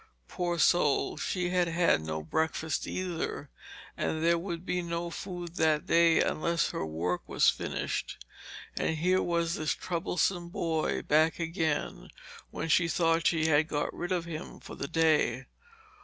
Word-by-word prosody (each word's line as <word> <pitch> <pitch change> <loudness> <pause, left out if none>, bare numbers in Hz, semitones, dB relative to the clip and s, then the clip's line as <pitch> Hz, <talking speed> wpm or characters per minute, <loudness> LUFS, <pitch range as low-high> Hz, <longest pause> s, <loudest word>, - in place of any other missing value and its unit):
Poor 175 -1 -2
soul, 155 -2 +3
she 180 -1 -2
had 180 -1 +2
had 170 - +2
no 80 0 -4
breakfast 160 - -1
either, 170 -5 -4 0.4
and 160 0 -2
there 170 0 +3
would 170 -1 -5
be 180 -2 -1
no 170 0 -3
food 175 -1 -7
that 155 -1 +2
day 165 -1 +4
unless 170 +1 +1
her - - -3
work 85 +3 -2
was - - +4
finished. - - -3 0.6
And 160 - -1
here 185 +4 +2
was 170 -1 0
this 155 -2 -1
troublesome 175 0 -1
boy 165 -2 -1
back 155 +2 +3
again, 160 - -2 0.4
when - - -4
she 170 +1 +3
thought 165 0 +2
she 160 -2 +2
had 155 0 +3
got 145 -1 -2
rid 175 +2 -5
of 175 -2 0
him 165 0 -7
for - - -11
the 140 - -5
day. 150 -6 +2
165 Hz, 155 wpm, -29 LUFS, 155-175 Hz, 0.6 s, day